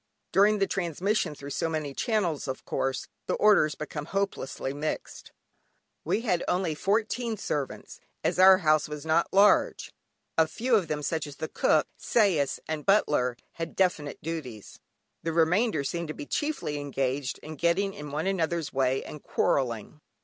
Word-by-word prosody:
During 210 +2 +5
the 195 - +2
transmission 180 -1 -1
through 140 0 -8
so 165 +4 -1
many 155 -3 -3
channels, 185 - -1
of 130 - -5
course 135 -1 -2 0.2
the - - +1
orders 200 -8 +4
become 150 -1 -5
hopelessly 195 -8 -2
mixed. 150 +2 -5 0.7
We 220 - 0
had 180 -7 0
only 180 -3 +1
fourteen 220 +6 0
servants, 145 -7 -4 0.2
as - - 0
our 190 0 +9
house 155 0 +3
was 150 0 -6
not 160 +2 +2
large! 200 +2 +4 0.5
A 160 - +5
few 240 +10 -2
of 195 -6 +2
them, 150 -1 -3
such 160 0 -1
as 145 - -9
the 160 - -4
cook, - - +2
sais, 180 - +2
and 155 -1 -3
butler 145 - +2 0.2
had 165 0 -5
definite 170 -6 0
duties, 140 -10 -6 0.4
the 165 - -2
remainder 170 +3 +2
seemed 170 +4 -3
to 155 - -5
be 300 - -7
chiefly 295 - -2
engaged 135 -1 -2
in 155 0 -7
getting 175 +6 +1
in 150 -3 -8
one 150 +4 -2
another's 170 -4 -1
way 130 0 +1
and 150 - -9
quarrelling. 125 +2 -1
160 Hz, 160 wpm, -28 LUFS, 145-195 Hz, 0.7 s, our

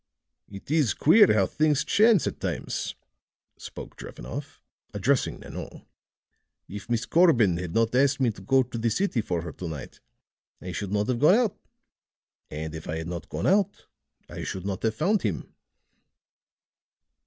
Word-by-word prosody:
"It 100 +7 -10
is 150 - +2
queer 160 - +6
how 105 -3 +3
things 150 +5 +1
chance 215 -3 +4
at - - -4
times," - - -3 0.6
spoke - - -10
Drevenoff, 60 +2 -8 0.4
addressing - - 0
Nanon. - - -9 0.8
"If 100 +3 -9
Miss 120 -1 0
Corbin 125 - +4
had 85 -1 -5
not 115 0 +2
asked 140 +2 +3
me 125 -3 +2
to 100 - -13
go 130 +7 +3
to 120 -1 -7
the 115 +1 +1
city 185 - 0
for 90 -5 -3
her 85 - -6
to 90 - -7
night, 75 -5 -8 0.6
I 90 - -7
should 100 +1 -4
not 105 +1 0
have 125 -2 0
gone 155 +8 +6
out; 230 -5 +1 0.9
and 75 +1 -5
if 80 -1 -8
I 80 - -2
had 80 +1 -5
not 85 -3 -6
gone - - -4
out, 200 +1 +1 0.4
I - - -7
should 95 0 -5
not 95 -2 -3
have 110 -1 0
found 195 - +1
him." 100 -6 -3
115 Hz, 165 wpm, -26 LUFS, 90-150 Hz, 0.9 s, queer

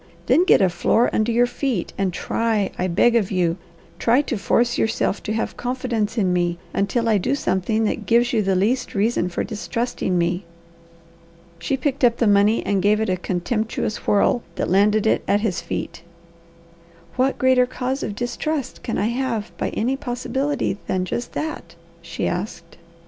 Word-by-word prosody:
"Then 350 - +4
get 280 - +5
a 190 - +4
floor 200 +7 +2
under 220 +2 +1
your 240 +1 +4
feet, 245 -6 -2
and 195 -2 0
try, 215 +2 -1
I 185 - -1
beg 230 +7 +3
of 215 -5 +2
you, 175 -2 0 0.4
try 245 +5 +3
to 265 - -3
force 235 +3 +1
yourself 220 -2 0
to 215 - -3
have 225 - -2
confidence 245 -3 -2
in 190 -4 +2
me, 175 -1 0 0.2
until 230 +4 0
I 215 -3 +3
do 265 +9 0
something 215 -1 0
that 215 - -2
gives 240 +2 +3
you 225 - +3
the 195 -1 +1
least 235 +7 0
reason 200 -3 +1
for 175 - -2
distrusting 220 -3 -2
me." 175 +2 0 1.2
She 265 +11 -1
picked 275 0 -2
up 235 -1 +4
the 235 - +2
money 205 +2 +3
and 200 -2 +1
gave 210 +2 +3
it 220 -2 -1
a - - +2
contemptuous 210 +5 -2
whirl 205 +4 +3
that - - -2
landed 210 +3 +3
it 220 - +2
at 205 - +2
his 210 -5 -1
feet. 170 - -5 1.1
"What 260 +2 +1
greater 260 -1 +4
cause 260 +2 -3
of 205 - -4
distrust 260 +4 -3
could 230 - -3
I - - +1
have 235 -3 -2
by - - -1
any 250 +5 -1
possibility 265 -3 -2
than 185 -1 0
just 240 +6 -4
that?" 300 - -5 0.3
she 170 - -3
asked. 175 -2 -5
220 Hz, 175 wpm, -22 LUFS, 190-245 Hz, 1.2 s, get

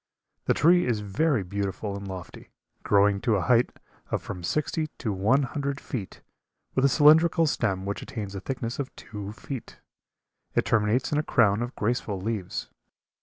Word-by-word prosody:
The - - +2
tree 175 0 +5
is 115 -4 0
very 110 +4 +1
beautiful 100 +2 -3
and 100 0 -6
lofty, 95 -2 -8 0.3
growing 100 0 +3
to 115 - +2
a 95 - +1
height 125 -1 +4 0.4
of - - 0
from 90 - -6
sixty 150 - -1
to 110 -5 -2
one 110 +9 +3
hundred 140 +1 -3
feet, 105 -7 -6 0.5
with 130 - +1
a 140 - +6
cylindrical 160 +4 +6
stem 95 -10 0
which 100 +1 -3
attains 105 -5 -6
a 100 - -4
thickness 120 +2 -4
of 140 -1 -2
two 105 -2 -7
feet. 125 +3 -8 0.8
It - - +2
terminates 110 +4 +2
in 150 - +2
a - - 0
crown 110 -6 +3
of 120 +1 -4
graceful 105 -3 -1
leaves. 100 -2 -4
115 Hz, 170 wpm, -27 LUFS, 100-140 Hz, 0.8 s, a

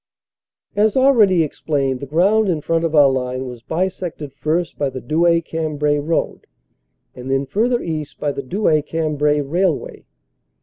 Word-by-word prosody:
As 210 +4 +2
already 220 -10 +5
explained, 140 -3 -2
the 140 - -7
ground 195 +8 +2
in 160 -4 0
front 165 +2 0
of 160 -1 -1
our 145 -2 +7
line 130 -1 -2
was 125 -2 -8
bisected 170 -2 -4
first 160 +4 -2
by 140 -2 +1
the 130 - -6
Douai 170 +4 +2
Cambrai 150 -3 -1
road, 160 +3 -2 0.7
and 125 +1 -9
then, 135 +1 +1
further 235 - 0
east, 155 -3 -5
by 145 - -1
the 140 - -5
Douai 155 +1 +1
Cambrai 150 -1 0
railway. 165 +3 -1
155 Hz, 150 wpm, -19 LUFS, 140-175 Hz, 0.7 s, our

